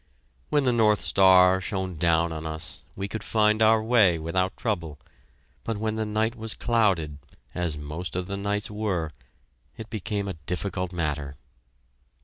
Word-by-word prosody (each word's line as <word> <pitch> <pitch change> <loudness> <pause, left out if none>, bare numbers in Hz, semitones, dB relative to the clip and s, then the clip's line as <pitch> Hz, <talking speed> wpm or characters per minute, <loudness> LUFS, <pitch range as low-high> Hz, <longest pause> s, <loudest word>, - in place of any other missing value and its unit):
When 145 -1 +2
the 125 -2 +2
North 110 -3 +3
Star 95 -1 +5
shone 95 -2 -3
down 85 0 +2
on 80 -1 -5
us, 80 0 -6
we 100 +1 -3
could 110 0 -6
find 110 0 +2
our 110 0 +5
way 110 -7 +4
without 90 +4 -1
trouble, 85 -9 -3 0.7
but 115 -2 -3
when 110 +1 -1
the 110 0 -2
night 110 +2 0
was 110 -1 -4
clouded, 95 -11 +1 0.3
as 85 -4 -1
most 75 +5 -6
of 90 0 -2
the 100 +2 -4
nights 100 +1 -2
were, 95 -7 -2 0.7
it 110 0 -9
became 100 -1 -3
a 95 - -3
difficult 90 0 -2
matter. 75 -5 -3
95 Hz, 155 wpm, -26 LUFS, 85-110 Hz, 0.7 s, Star